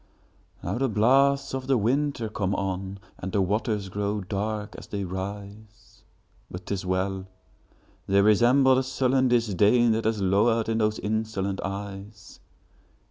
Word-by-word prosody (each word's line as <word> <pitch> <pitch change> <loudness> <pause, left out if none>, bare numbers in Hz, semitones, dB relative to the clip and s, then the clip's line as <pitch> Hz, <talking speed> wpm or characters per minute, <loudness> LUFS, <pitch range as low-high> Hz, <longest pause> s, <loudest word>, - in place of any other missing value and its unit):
Now 95 +7 -2
the 135 -1 +1
blasts 135 +6 +3
of 130 -1 -4
the 135 -2 +3
winter 130 +2 0
come 100 -2 -2
on, 95 0 -3 0.2
And 95 - -5
the 100 - 0
waters 105 +1 -1
grow 100 +2 -2
dark 105 +2 -3
as - - -10
they 100 -1 -4
rise! 100 +3 -8 0.5
But 90 +1 -8
't - - -3
is 95 -1 -3
well!—they 95 +1 -3
resemble 120 +6 +5
the - - +3
sullen 130 0 +1
disdainThat 115 0 +3
has 110 -1 0
lowered 110 +4 +2
in 115 0 0
those 110 0 +1
insolent 105 -2 -2
eyes. 100 +1 -7
105 Hz, 135 wpm, -26 LUFS, 100-120 Hz, 0.5 s, resemble